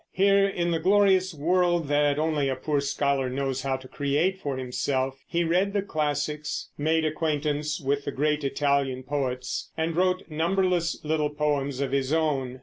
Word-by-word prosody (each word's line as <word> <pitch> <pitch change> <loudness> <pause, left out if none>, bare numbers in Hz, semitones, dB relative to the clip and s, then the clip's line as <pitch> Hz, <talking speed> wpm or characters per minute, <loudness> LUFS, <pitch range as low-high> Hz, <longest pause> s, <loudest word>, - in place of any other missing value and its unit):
Here 195 +1 +4
in 175 -3 -1
the 165 - 0
glorious 190 +1 +4
world 175 +1 +1
that 145 0 +2
only 150 -3 +1
a 130 - -1
poor 145 +2 -1
scholar 140 -1 0
knows 135 0 -2
how 135 0 -1
to 130 0 -13
create 150 +8 0
for 140 -6 -3
himself 130 +1 -2
he 170 0 0
read 180 +4 +1
the 200 -2 0
classics, 150 -3 -2
made 160 +2 +1
acquaintance 150 -1 -1
with 140 -1 -1
the - - -2
great 150 +2 0
Italian 140 -2 0
poets, 130 -2 -3
and 160 0 -1
wrote 185 +1 +1
numberless 175 +1 0
little 150 -1 +1
poems 145 -2 -1
of 135 -2 -1
his 135 0 0
own. 140 -5 0
150 Hz, 165 wpm, -26 LUFS, 140-170 Hz, -, Here